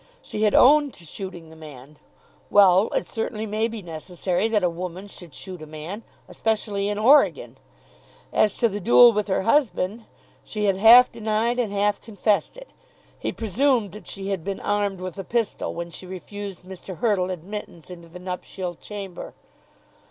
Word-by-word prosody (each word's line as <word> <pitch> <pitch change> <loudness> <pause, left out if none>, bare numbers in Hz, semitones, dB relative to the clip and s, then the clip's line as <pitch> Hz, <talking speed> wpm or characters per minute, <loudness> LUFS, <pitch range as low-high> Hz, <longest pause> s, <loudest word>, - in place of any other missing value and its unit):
She 210 - -5
had 210 -1 +3
owned 290 +1 +5
to 170 - -10
shooting 175 -1 -8
the - - -13
man. 150 -2 -13 0.5
Well; 195 0 +6
it - - 0
certainly 220 -1 -4
may 215 +1 0
be 225 -3 -7
necessary 175 +4 -2
that 215 -3 +1
a - - +4
woman 180 +2 -6
should 180 -4 -12
shoot 180 +1 -8
a 155 - -9
man 155 +7 -7 0.3
especially 210 -2 -1
in 205 - -2
Oregon. 265 +8 +3 0.7
As 210 -2 +2
to 235 - +3
the 205 -1 -4
duel 240 +4 +7
with 210 0 -1
her 190 -1 0
husband, 225 -4 +1 0.4
she 210 -1 -3
had 195 -2 +2
half 235 +5 +8
denied 225 +2 -1
and 225 -5 0
half 205 0 0
confessed 215 - -1
it. - - -13 0.5
He - - -2
presumed 230 0 +1
that 210 +3 -12
she 195 0 -6
had 190 -5 -2
been 195 +1 -4
armed 205 -2 -1
with 185 +1 -6
a - - -4
pistol 230 +3 -2
when 170 0 -5
she 185 - -9
refused 190 +2 -8
Mr. 185 -1 -8
Hurtle 205 -6 +1
admittance 185 -1 -7
into 170 -1 -11
the 175 - -10
nuptial 180 0 -5
chamber. 195 0 -8
200 Hz, 175 wpm, -24 LUFS, 180-220 Hz, 0.7 s, half